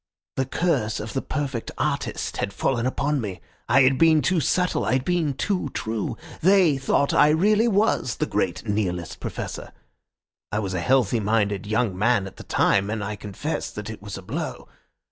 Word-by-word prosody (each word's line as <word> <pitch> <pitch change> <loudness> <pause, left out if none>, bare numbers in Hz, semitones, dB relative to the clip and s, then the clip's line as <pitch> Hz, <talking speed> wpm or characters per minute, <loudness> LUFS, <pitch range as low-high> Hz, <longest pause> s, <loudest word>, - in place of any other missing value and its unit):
The 130 -1 -1
curse 130 -9 0
of 110 +1 -6
the 135 - -1
perfect 140 -6 -3
artist - - -2
had 100 - -2
fallen 120 +2 0
upon 140 +2 0
me. 100 -4 -5 0.3
I 140 - +6
had 130 0 +3
been 160 -3 +5
too 175 +5 +2
subtle, 180 +5 +1
I - - 0
had 130 0 +1
been 170 -6 0
too 185 -4 -1
true. 110 +1 -3 0.2
They 185 -4 +5
thought 140 +1 +1
I 150 - +6
really 210 +8 +3
was 205 - +2
the - - -1
great 100 +1 -2
Nihilist 90 -5 -2
Professor. - - -6 0.8
I 105 - -1
was 100 -3 -2
a 90 - -1
healthy 120 +2 +2
minded 105 -2 0
young 110 -2 0
man 105 +1 +2
at 95 -1 -10
the - - -9
time, 100 +1 +2
and 110 -1 -2
I 105 +1 -3
confess 105 +10 -4
that 105 +1 -6
it 110 - -9
was 100 -1 -7
a 95 - -9
blow. - - -5
120 Hz, 185 wpm, -24 LUFS, 105-150 Hz, 0.8 s, I